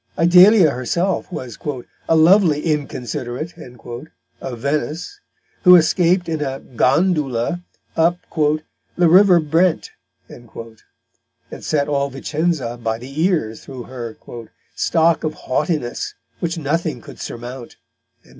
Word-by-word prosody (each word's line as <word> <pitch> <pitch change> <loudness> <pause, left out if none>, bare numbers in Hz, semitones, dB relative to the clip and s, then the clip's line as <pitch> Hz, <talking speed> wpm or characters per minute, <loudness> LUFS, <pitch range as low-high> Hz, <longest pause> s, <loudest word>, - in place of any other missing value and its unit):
Idalia 180 +1 +6
herself 170 +11 -2
was 125 -9 -7 0.5
"a 165 - +4
lovely 165 -1 +5
Inconsiderate" 145 -1 -3
of 125 -1 -10
Venice, 150 - -3 0.4
who 180 -2 +9
escaped 175 +1 +3
in 160 -2 -2
a 135 -2 -3
"Gondula" 145 - 0 0.3
up 170 +2 +2 0.2
"the 155 +3 -1
River 180 +1 +6
Brent," 160 +3 +1 0.4
and 120 -2 -14 1.1
set 145 -2 0
all 140 -1 0
Vicenza 140 -2 -2
by 110 -1 -1
the 135 +6 -6
ears 155 - -1
through 130 -3 -8
her 120 -2 -8 0.6
"stock 165 0 +2
of 155 -1 -2
Haughtiness, 150 -2 -2 0.2
which 170 0 -2
nothing 155 -2 -2
could - - -13
surmount." 120 +1 -8
155 Hz, 110 wpm, -20 LUFS, 130-170 Hz, 1.1 s, who